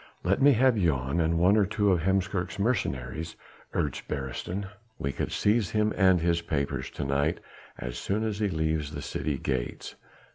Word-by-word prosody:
"Let 95 +7 +1
me 140 +1 +7
have 130 0 +4
Jan 70 -3 +1
and 80 0 +2
one 90 +4 +5
or 105 -2 +4
two 105 -1 +2
of 90 -3 +2
Heemskerk's 95 +1 0
mercenaries," 80 - -1 0.4
urged 75 - -2
Beresteyn, 75 +8 -4 0.3
"we 70 - -2
could - - -3
seize 105 -2 +2
him 105 0 +1
and 95 -2 +5
his 85 0 +2
papers 75 -4 -2
to 70 - -5
night 70 +4 +1 0.4
as - - -5
soon 105 +3 -1
as 110 -2 -2
he 105 -2 +1
leaves 80 -3 -1
the 75 - -5
city 75 -3 -2
gates." 65 -2 -3
85 Hz, 175 wpm, -28 LUFS, 70-100 Hz, 0.4 s, me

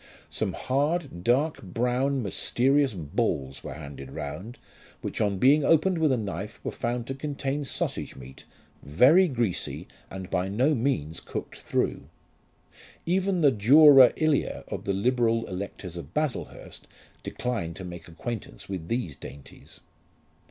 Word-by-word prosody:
Some - - -1
hard 140 - -1
dark 140 - +1
brown 125 +7 0
mysterious 130 +5 +1
balls 75 - -2
were - - -6
handed 70 -3 -9
round, 95 +11 -6 0.4
which - - -4
on 100 -2 +1
being 140 +8 +5
opened 165 +4 +3
with 155 -3 +3
a 130 - +2
knife 100 0 -5
were - - -3
found 120 0 -3
to 135 - -4
contain 140 0 -3
sausage - - -3
meat, 65 0 -12 0.4
very 135 - +5
greasy 120 - -2 0.2
and 95 -1 -8
by 90 0 0
no 125 +10 +2
means 110 - -1
cooked - - -7
through. - - -2 1.0
Even 185 +1 +1
the 145 -3 +6
dura 135 +4 +8
ilia 155 -2 0
of - - -5
the 100 - 0
liberal 115 +2 +1
electors 95 -2 -6
of 85 0 -9
Baslehurst 150 -4 -4 0.3
declined 110 -9 -3
to 95 - -8
make 85 -1 -9
acquaintance 85 - -7
with 90 -4 -5
these 105 - -2
dainties. 70 -1 -12
120 Hz, 140 wpm, -27 LUFS, 90-140 Hz, 1.0 s, dura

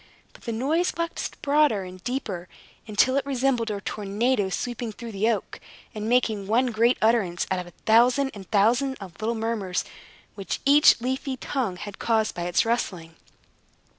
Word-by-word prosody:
But - - -17
the 235 - -2
noise 295 +10 +1
waxed 335 0 -4
broader 285 -8 +3
and 185 0 -10
deeper, 210 -9 -4 0.4
until 250 +5 +3
it 280 - +1
resembled 255 -4 0
a 205 -1 -3
tornado 205 +2 -1
sweeping 240 +3 -3
through 230 +2 -8
the 210 +2 +1
oak, 225 - -2 0.3
and 215 0 -4
making 220 -5 +1
one 245 +4 +2
great 235 +3 +3
utterance 210 -7 +2
out 185 - +1
of 180 - -5
the 175 - -14
thousand 245 +5 +4
and 195 -3 -11
thousand 240 +6 +2
of 190 -1 -11
little 230 +2 0
murmurs 220 -5 -2 0.5
which 195 -2 -4
each 285 -1 +6
leafy 260 +2 -2
tongue 250 -7 -2
had 205 +1 -8
caused 220 -2 +1
by 175 - -4
its 175 - +2
rustling. 180 -8 -2
225 Hz, 165 wpm, -25 LUFS, 200-255 Hz, 0.5 s, each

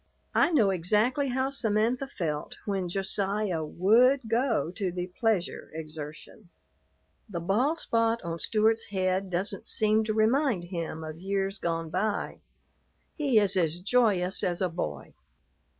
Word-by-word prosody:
I - - +4
know 235 - +3
exactly 215 - +1
how 260 +1 0
Samantha 235 +1 0
felt 160 - -4
when 195 -3 -2
Josiah 195 -1 -1
would 230 - +4
go 230 - +1
to 190 -1 -2
the 180 +1 -5
"pleasure 220 -6 0
exertion." 155 +4 -8 0.8
The 175 -4 -4
bald 230 - +1
spot 230 -4 +1
on 170 - -4
the - - -17
Stewart's 220 +3 +2
head 190 0 -1
doesn't 190 +3 -3
seem 215 0 +2
to 215 - -1
remind 225 - +2
him 165 -3 -5
of 155 0 -7
years 195 +1 -2
gone 165 -1 -2
by; 205 +4 -2 0.7
he 280 -7 +2
is 205 -2 +4
as 170 -2 +1
joyous 195 -3 +2
as 175 -1 0
a 185 - +1
boy. 75 - -5
195 Hz, 140 wpm, -28 LUFS, 175-225 Hz, 0.8 s, I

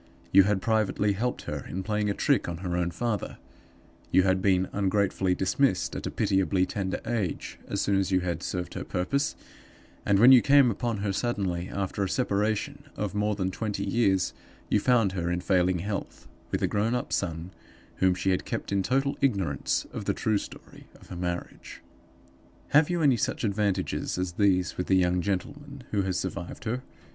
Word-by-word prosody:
You 95 0 +7
had 100 -2 0
privately 105 -2 +1
helped 120 +5 -2
her - - -5
in 95 +2 -4
playing 105 +1 0
a 100 - -1
trick - - +1
on 85 - -4
her 90 -1 -1
own 90 -1 0
father; 105 +4 -3 0.7
you 95 - +4
had 95 0 +2
been 95 -1 +2
ungratefully 95 -2 +1
dismissed, 95 0 +1
at - - -4
a - - -1
pitiably 95 -1 +1
tender 95 -1 -3
age, 110 -7 -3
as 100 - -2
soon 100 -1 +2
as 95 -1 0
you 95 -1 +3
had 90 -1 -2
served 90 -1 -4
her - - -4
purpose; 140 +11 -1 0.7
and, 100 - +3
when 120 +6 +8
you 130 -2 +9
came 140 -3 +5
upon 115 -1 -2
her 100 - 0
suddenly, 95 -6 -2
after 100 0 -2
a 95 - -1
separation 110 +6 -1
of 105 -3 -3
more 105 0 0
than 95 -2 -1
twenty 105 0 -3
years, 95 -3 +1 0.4
you 105 - +3
found 115 -3 +3
her 85 -2 -2
in 90 0 0
failing 90 -1 +2
health, 100 +3 -5 0.2
with - - -2
a - - +3
grown 110 +3 0
up 125 - -3
son, 85 -1 -2 0.5
whom 95 -1 +3
she 90 +1 0
had 90 - 0
kept - - -4
in 100 -1 +2
total 135 +7 0
ignorance 95 - 0
of - - -5
the - - 0
true 110 -2 +1
story - - -11
of - - -18
her - - -6
marriage. 85 0 -5 0.9
"Have 150 +2 +5
you 175 -2 0
any 135 -5 +4
such 130 +2 -2
advantages 100 -4 -1
as 90 -1 -1
these 90 -1 +1
with 90 - -2
the 95 - +4
young 90 -1 +2
gentleman 140 +9 -4
who 105 - +1
has 95 -2 -1
survived 90 +1 -5
her? 120 +3 -2
100 Hz, 190 wpm, -27 LUFS, 90-110 Hz, 0.9 s, you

